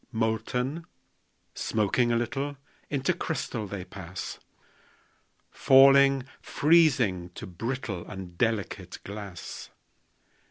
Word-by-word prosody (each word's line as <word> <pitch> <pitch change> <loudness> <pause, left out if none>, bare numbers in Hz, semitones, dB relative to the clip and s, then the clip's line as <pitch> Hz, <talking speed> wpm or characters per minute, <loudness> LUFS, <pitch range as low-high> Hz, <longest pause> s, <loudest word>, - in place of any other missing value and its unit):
Molten, 125 +7 -1 0.7
smoking 110 +3 +1
a - - +2
little, 135 +5 -2 0.3
Into 140 -2 +1
crystal 120 -8 -3
they 95 -2 -6
pass; 90 -1 -7 1.1
Falling, 135 0 +6 0.2
freezing, 130 - +3
to - - -7
brittle 110 0 -4
And 90 -2 -8
delicate 110 0 -2
glass. 100 -4 -8
115 Hz, 85 wpm, -28 LUFS, 95-135 Hz, 1.1 s, Falling